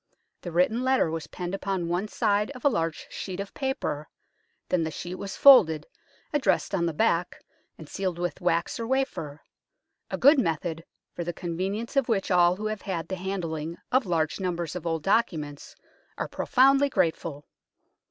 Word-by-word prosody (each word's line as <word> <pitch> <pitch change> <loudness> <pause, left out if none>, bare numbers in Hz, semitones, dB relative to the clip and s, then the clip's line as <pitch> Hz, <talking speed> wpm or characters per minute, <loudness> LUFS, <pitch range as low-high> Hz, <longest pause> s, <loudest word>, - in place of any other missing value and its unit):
The 175 - -6
written 180 +8 +2
letter 260 -10 +2
was 160 -2 -4
penned 180 +2 -5
upon 195 -3 -2
one 175 +4 -1
side 205 0 +1
of 255 - -10
a - - +7
large 165 - -2
sheet 185 -1 -5
of 200 0 -5
paper, 265 - -3 0.6
then 180 - +2
the 160 - -1
sheet 175 +3 -6
was 195 +1 -6
folded, 175 - +7 0.5
addressed 280 -7 +1
on 170 -3 +1
the - - 0
back, 175 -3 0 0.3
and 160 - -11
sealed 185 -1 -3
with 175 0 -3
wax 170 +2 0
or 230 - -3
wafer 230 - -2 0.7
a - - -3
good 285 +2 +6
method, 165 - -1 0.3
for 175 - -4
the 175 +1 -3
convenience 190 +9 -3
of 275 -3 +2
which 195 -4 0
all 175 0 +5
who 210 +3 -6
have 215 -1 -3
had 175 -5 -4
the 190 - -2
handling 170 -4 -4
of 255 -4 +2
large 160 -1 0
numbers 175 -3 -3
of 175 -2 -4
old 165 -2 -1
documents 155 -9 -1 0.4
are - - -2
profoundly 275 +1 +3
grateful. 160 - -1
180 Hz, 170 wpm, -27 LUFS, 165-215 Hz, 0.7 s, a